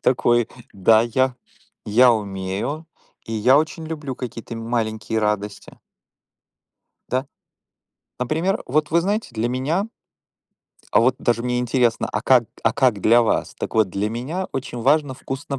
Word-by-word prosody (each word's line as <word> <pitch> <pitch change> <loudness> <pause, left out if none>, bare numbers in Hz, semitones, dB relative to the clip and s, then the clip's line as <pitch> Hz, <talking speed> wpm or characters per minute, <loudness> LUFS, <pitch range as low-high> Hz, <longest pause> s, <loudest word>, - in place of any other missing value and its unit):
такой: 120 -2 +2 0.2
да, 110 +3 +4
я 130 +2 0 0.5
я 120 +3 +6
умею, 105 - -3 0.4
и 115 - -7
я 125 +6 +4
очень 160 +1 -2
люблю 150 -5 -5
какие-то 115 -2 -7
м 115 - -6
маленькие 110 -1 -1
радости. 105 -1 -2 1.4
Да. 130 +2 -1 0.9
Например, 165 - 0
вот, 150 +3 0
вы 170 +1 +4
знаете, 205 +4 -1
для 115 +2 -1
меня 150 - -1 1.1
а - - +5
вот 125 +2 +3
даже 120 -1 0
мне 125 0 -1
интересно, 120 -1 +1
а 105 - 0
как 125 -1 +4 0.2
а 115 - +3
как 125 -7 +2
для 120 +4 +5
вас? 110 - 0
Так - - -5
вот, 110 -3 +3
для 100 +3 -2
меня 145 +11 -3
очень 125 -2 -4
важно 140 0 +2
вкусно 135 +1 -5
125 Hz, 145 wpm, -22 LUFS, 110-140 Hz, 1.4 s, я